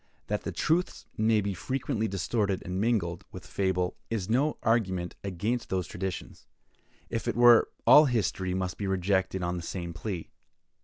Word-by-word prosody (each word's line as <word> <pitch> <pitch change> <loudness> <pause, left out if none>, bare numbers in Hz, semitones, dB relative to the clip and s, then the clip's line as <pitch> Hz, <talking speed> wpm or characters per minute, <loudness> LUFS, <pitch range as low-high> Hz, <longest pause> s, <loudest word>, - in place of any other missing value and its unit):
That - - -2
the - - -4
truths 175 +3 0
may 110 0 +3
be 100 0 -2
frequently 110 +2 -2
distorted 100 +1 -1
and 90 +2 -2
mingled 100 -7 0
with - - -9
fable, 95 -1 -1
is 110 -3 -2
no 140 +6 +2
argument 95 -6 0
against 105 +6 -2
those 95 -2 -1
traditions; 90 +2 -6 0.6
if 115 - -3
it - - 0
were, 120 -1 +7 0.2
all 150 - +9
history 95 -7 0
must 95 -1 -3
be 100 - -2
rejected 95 0 0
on 85 +1 -1
the - - -4
same 85 0 -5
plea. 85 0 -5
95 Hz, 160 wpm, -28 LUFS, 90-115 Hz, 0.6 s, all